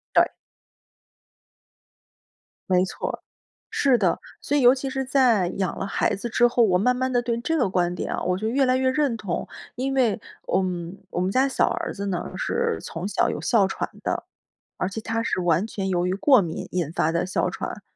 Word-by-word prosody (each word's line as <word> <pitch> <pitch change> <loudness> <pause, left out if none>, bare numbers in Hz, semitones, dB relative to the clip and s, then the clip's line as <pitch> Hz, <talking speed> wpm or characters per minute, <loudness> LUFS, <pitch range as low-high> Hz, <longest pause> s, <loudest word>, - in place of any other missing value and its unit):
对。 - - +5 2.4
没 185 0 +4
错 - - -4
儿， - - -5 0.5
是 270 -3 +3
的。 185 -4 +2 0.2
所 290 - 0
以 - - +3
尤 250 +1 +7
其 270 0 -4
是 265 0 -2
在 245 -9 +3
养 190 -2 -1
了 - - -2
孩 - - 0
子 235 +5 -4
之 240 +2 +4
后， 240 0 +2
我 180 -3 +3
慢 250 +5 +3
慢 260 +1 -1
地 245 0 +2
对 235 -1 -1
这 325 +6 0
个 245 -9 +2
观 180 -1 0
点 - - -4
啊， - - -2
我 180 0 0
就 215 +3 -2
越 270 +3 +2
来 255 0 +3
越 260 0 +2
认 270 -4 +1
同。 195 -5 -4 0.3
因 270 +2 -1
为， 235 -6 +2 0.3
嗯， 180 -1 -1
我 175 - -2
们 185 +1 +1
家 265 +5 +3
小 - - +2
儿 - - -3
子 200 0 -4
呢 180 -3 -3
是 470 -1 -1
从 185 - -5
小 - - +1
有 - - -4
哮 215 -6 +3
喘 - - -3
的， - - -2 0.5
而 185 - -1
且 220 +3 -5
他 225 +1 -2
是 185 - -1
完 175 +3 +2
全 195 -3 -4
由 180 -1 +1
于 185 - 0
过 255 +3 +5
敏 165 -2 -4
引 170 -4 -1
发 160 -1 +1
的 170 +2 0
哮 185 - 0
喘。 - - -6
215 Hz, 225 characters per minute, -24 LUFS, 185-255 Hz, 2.4 s, 尤